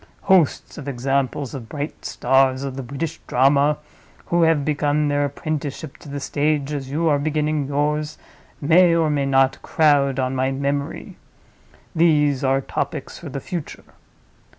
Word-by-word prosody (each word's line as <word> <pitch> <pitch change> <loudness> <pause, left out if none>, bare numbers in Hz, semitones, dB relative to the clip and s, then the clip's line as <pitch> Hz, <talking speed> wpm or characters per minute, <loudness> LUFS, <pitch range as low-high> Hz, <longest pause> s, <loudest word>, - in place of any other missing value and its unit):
Hosts 185 -8 +2
of 145 - -9
examples 135 +1 -1
of 125 -5 -7
bright 145 +1 -6
stars 135 0 +2
of 135 -2 -4
the 135 - -4
British 140 +6 -5
drama, 140 +3 +3 0.5
who 175 0 +1
have 160 -4 +3
begun 150 0 +1
their 145 0 +1
apprenticeship 145 -2 -5
to - - -13
the 140 0 -4
stage 145 0 -1
as 135 -2 -4
you 160 +4 0
are 145 -2 +3
beginning 150 -1 -1
yours, 150 +2 -1 0.4
may, 170 +3 +5
or 160 -2 +2
may 140 -2 0
not, 135 -1 +2
crowd 145 -4 +2
on 130 0 0
my 130 0 0
memory. 140 +1 -3 0.8
These 150 -4 +3
are 135 0 +2
topics - - -4
for - - -8
the - - -5
future. 170 +2 -6
145 Hz, 150 wpm, -22 LUFS, 135-150 Hz, 0.8 s, may